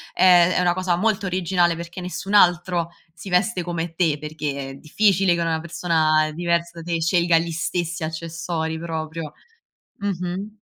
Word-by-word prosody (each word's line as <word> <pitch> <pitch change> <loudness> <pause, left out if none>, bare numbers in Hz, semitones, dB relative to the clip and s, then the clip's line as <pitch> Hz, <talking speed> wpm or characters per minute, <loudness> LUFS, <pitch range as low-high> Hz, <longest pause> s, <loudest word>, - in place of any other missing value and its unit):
ehm, 180 -1 +6
è - - +1
una 175 -1 +3
cosa 185 -1 0
molto 200 +1 0
originale, 180 -1 +1
perché 170 +2 -7
nessun 180 +3 -5
altro 175 -3 +4 0.3
si 185 +3 -10
veste 180 +2 +1
come 170 -1 -4
te, 165 -3 +1
perché 145 -3 -4
è - - -8
difficile 190 +4 +2
che 170 - -2
una 165 -1 0
persona 160 -2 +1
diversa 170 0 -1
da - - -10
te 165 - +1
scelga 170 0 +3
gli 165 +1 -1
stessi 170 +1 -2
accessori 160 0 -4
proprio. 160 -2 -5 0.7
Mh-mh. 195 +2 -4
170 Hz, 155 wpm, -22 LUFS, 160-180 Hz, 0.7 s, ehm